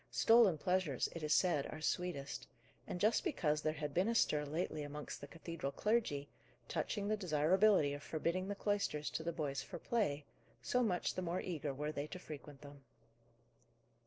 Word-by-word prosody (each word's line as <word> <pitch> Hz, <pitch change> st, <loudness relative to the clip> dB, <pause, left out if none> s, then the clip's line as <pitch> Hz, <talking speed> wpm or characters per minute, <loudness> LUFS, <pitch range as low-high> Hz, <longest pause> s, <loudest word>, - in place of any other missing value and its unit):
Stolen 225 Hz, -7 st, +5 dB
pleasures, 180 Hz, -5 st, +1 dB
it 165 Hz, -, -4 dB
is 150 Hz, -1 st, -2 dB
said, 155 Hz, -4 st, +3 dB
are -, -, -7 dB
sweetest; 165 Hz, -3 st, -2 dB, 0.4 s
and, 180 Hz, -, -4 dB
just 215 Hz, +4 st, +3 dB
because 150 Hz, -2 st, +1 dB
there 155 Hz, 0 st, 0 dB
had 150 Hz, -2 st, -4 dB
been 185 Hz, +6 st, +2 dB
a 230 Hz, -, +1 dB
stir 150 Hz, -9 st, +3 dB
lately 155 Hz, +1 st, -2 dB
amongst 145 Hz, 0 st, -6 dB
the 145 Hz, -, -7 dB
cathedral 165 Hz, -3 st, -5 dB
clergy, 210 Hz, -9 st, 0 dB, 0.4 s
touching 205 Hz, -2 st, -2 dB
the 215 Hz, -, +2 dB
desirability 180 Hz, -2 st, +3 dB
of 145 Hz, -, -5 dB
forbidding 170 Hz, +5 st, -1 dB
the 205 Hz, -, -2 dB
cloisters 200 Hz, -8 st, -1 dB
to -, -, -2 dB
the 165 Hz, +1 st, -2 dB
boys 145 Hz, -4 st, -2 dB
for -, -, -7 dB
play, 155 Hz, -12 st, 0 dB, 0.4 s
so 250 Hz, -, +2 dB
much 190 Hz, -7 st, +1 dB
the 185 Hz, -, -3 dB
more 180 Hz, +1 st, -1 dB
eager 155 Hz, -5 st, -3 dB
were 150 Hz, +3 st, -3 dB
they 145 Hz, 0 st, -3 dB
to 185 Hz, -, -7 dB
frequent 150 Hz, -4 st, -9 dB
them. 140 Hz, -1 st, -12 dB
160 Hz, 180 wpm, -37 LUFS, 145-185 Hz, 0.4 s, Stolen